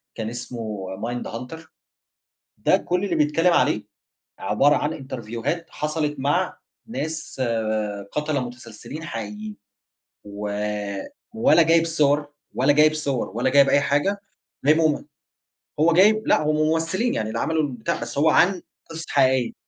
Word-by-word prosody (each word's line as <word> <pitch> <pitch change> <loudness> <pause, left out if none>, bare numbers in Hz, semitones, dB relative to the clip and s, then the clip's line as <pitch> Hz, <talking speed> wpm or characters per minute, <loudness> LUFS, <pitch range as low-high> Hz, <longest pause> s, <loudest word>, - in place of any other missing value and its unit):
كان 110 -1 -4
اسمه 115 -5 -6 0.2
Mindhunter. 125 +5 -5 1.0
ده - - +3
كل 180 +2 -1
اللي - - -1
بيتكلَّم 160 +4 +3
عليه 105 -9 +2 0.6
عبارة 145 +1 +3
عن 150 +2 -1
إنترفيوهات 130 +4 -4
حصلت 150 -1 -2
مع 160 +7 0 0.3
ناس 155 - -5 0.7
قتلة 150 -2 -1
متسلسلين 125 +5 -10
حقيقيين، 105 -4 -6 0.7
و 105 0 -6 0.9
ولا 230 -5 +5
جايب 165 +1 +4
صور 150 -2 +2 0.3
ولا 135 +4 +3
جايب 155 +1 +5
صور، 140 -8 -2
ولا 120 +6 0
جايب 140 0 +5
أي 140 - +4
حاجة، 145 +9 0 0.4
وجايبهم 155 0 +3 0.7
هو 165 +2 +4
جايب 215 +5 +4
لأ، - - +4
هُم 155 0 +1
ممثلين 165 +9 +1
يعني، 110 - -1
اللي - - -3
عملوا 160 0 +1
البتاع، 125 -6 -3
بس 120 - -6
هو 150 +3 +4
عن 185 -1 +3 0.3
قصص 165 0 -6
حقيقية. 130 -2 +2
145 Hz, 130 wpm, -23 LUFS, 120-160 Hz, 1.0 s, ولا